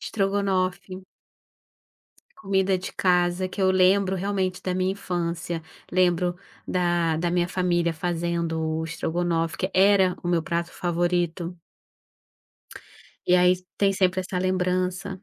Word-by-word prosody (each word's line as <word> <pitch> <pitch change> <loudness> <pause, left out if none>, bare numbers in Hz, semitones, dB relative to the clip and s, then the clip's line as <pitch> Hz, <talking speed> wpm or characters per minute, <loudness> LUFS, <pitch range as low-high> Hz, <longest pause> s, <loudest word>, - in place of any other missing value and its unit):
Estrogonofe. 190 -2 -1 1.3
Comida 190 -1 +1
de 185 - -6
casa 180 0 +1
que 190 +2 -5
eu 190 0 +4
lembro 190 +1 +3
realmente 190 -1 -2
da 185 - -2
minha 185 +1 0
infância. 175 -3 -3 0.3
Lembro 175 -1 +2 0.3
da 175 -2 +1
da 170 +1 -1
minha 175 0 +1
família 175 -2 0
fazendo 170 0 -2 0.2
o - - -2
estrogonofe, 165 0 -2
que - - -2
era 190 -1 +4
o - - -5
meu 170 -2 +1
prato 170 +1 -2
favorito. 175 0 -1 1.7
E - - +7
aí 180 0 +6
s 180 - -16 0.2
tem 200 -1 +4
sempre 185 0 +3
essa 185 0 -4
lembrança 185 0 0
180 Hz, 125 wpm, -25 LUFS, 175-185 Hz, 1.7 s, E